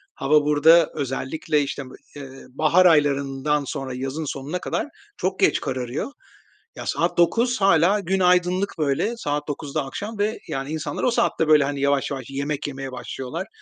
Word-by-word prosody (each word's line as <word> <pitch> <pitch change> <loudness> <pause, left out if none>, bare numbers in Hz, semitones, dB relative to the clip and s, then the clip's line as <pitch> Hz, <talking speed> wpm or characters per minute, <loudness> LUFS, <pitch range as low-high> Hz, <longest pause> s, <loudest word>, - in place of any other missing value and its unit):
hava 150 +1 +3
burada 160 +3 +5
özellikle, 145 +2 -1
işte, 140 0 -5
m 130 - -12 0.3
eee, 140 -2 -8 0.2
bahar 155 +7 +3
aylarından 145 -2 +2
sonra 130 0 -5
yazın 135 +5 -4
sonuna 140 +5 -4
kadar - - -2 0.3
çok 190 0 -2
geç - - +3
kararıyor. 130 - -3 0.6
Ya, - - -7
saat - - 0
21:00 230 +8 +2
hâlâ 195 +1 +4
gün 190 0 -1
aydınlık, 180 +2 +2
böyle 155 +11 0
saat 145 -6 -3
21:00'da 145 -1 -3
akşam 205 +10 -6
ve, 210 +2 0
yani, 135 0 -3
insanlar 155 -2 -4
o 250 - +3
saatte 160 -8 +1
böyle, 155 -2 +6
hani, 140 0 -3
yavaş 140 0 +1
yavaş 135 -3 -4
yemek 140 +2 -3
yemeye 135 -1 -6
başlıyorlar. 130 - -6
150 Hz, 165 wpm, -23 LUFS, 135-180 Hz, 0.6 s, böyle